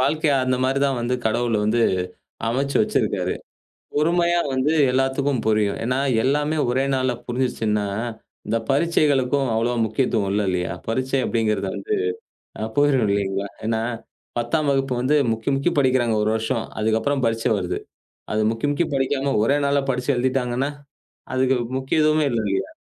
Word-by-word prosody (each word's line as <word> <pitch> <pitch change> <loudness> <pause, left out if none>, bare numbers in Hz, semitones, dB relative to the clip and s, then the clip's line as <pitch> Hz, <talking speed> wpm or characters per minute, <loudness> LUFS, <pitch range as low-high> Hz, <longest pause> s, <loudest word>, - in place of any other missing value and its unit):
வாழ்க்கைய 150 +2 +2
அந்த 130 0 +1
மாதிரிதான் 135 0 +1
வந்து 120 +2 0
கடவுளை 115 0 +1
வந்து 115 +3 +2 0.7
அமைச்சு 135 +4 0
வச்சிருக்காரு. - - 0 0.6
பொறுமையா 170 +3 +2
வந்து 130 +4 +1 0.2
எல்லாத்துக்கும் 135 0 +1
புரியும். 105 -2 +2
ஏன்னா 125 +3 0 0.2
எல்லாமே 150 +3 +1
ஒரே 130 +2 +1
நாள்ல 130 -1 +1
புரிஞ்சுச்சுன்னா, 115 -4 -1 0.6
இந்த 115 +2 +1
பரிட்சைகளுக்கும் 140 -3 +2
அவ்வளவு 115 0 +1
முக்கியத்துவம் 110 -2 0
இல்ல. 105 - +1
இல்லையா? 90 -1 -1
பரிட்சை 130 +3 0
அப்படிங்கறது 110 -2 0
வந்து 425 0 -2 0.7
அ - - 0
போயிரும். 145 -4 +3
இல்லீங்களா? 100 0 -1 0.2
ஏன்னா 110 0 0 0.6
10ஆம் 140 +6 0
வகுப்பு 135 -2 0
வந்து 135 +5 +2 0.2
முக்கி, 115 +4 -4
முக்கி 140 +6 +1
படிக்கிறாங்க 130 -4 +2
1 110 - +1
வருஷம். 110 +1 -1 0.2
அதுக்கப்புறம் 110 +6 +1
பரிட்சை 115 0 0
வருது. 90 -2 -2 0.5
அது 110 - +1
முக்கி, 115 +5 -2
முக்கி 160 +3 0
படிக்காம 135 +1 0
ஒரே 140 +6 +3
நாள்ல 140 0 +2
படிச்சு 125 +2 -1
எழுதிட்டாங்கன்னா, 130 +1 0 0.6
அதுக்கு 130 0 +2 0.2
முக்கியத்துவமே 155 +3 +2
இல்ல. 115 - +1
இல்லையா? 95 - -1
130 Hz, 140 wpm, -22 LUFS, 115-140 Hz, 0.7 s, போயிரும்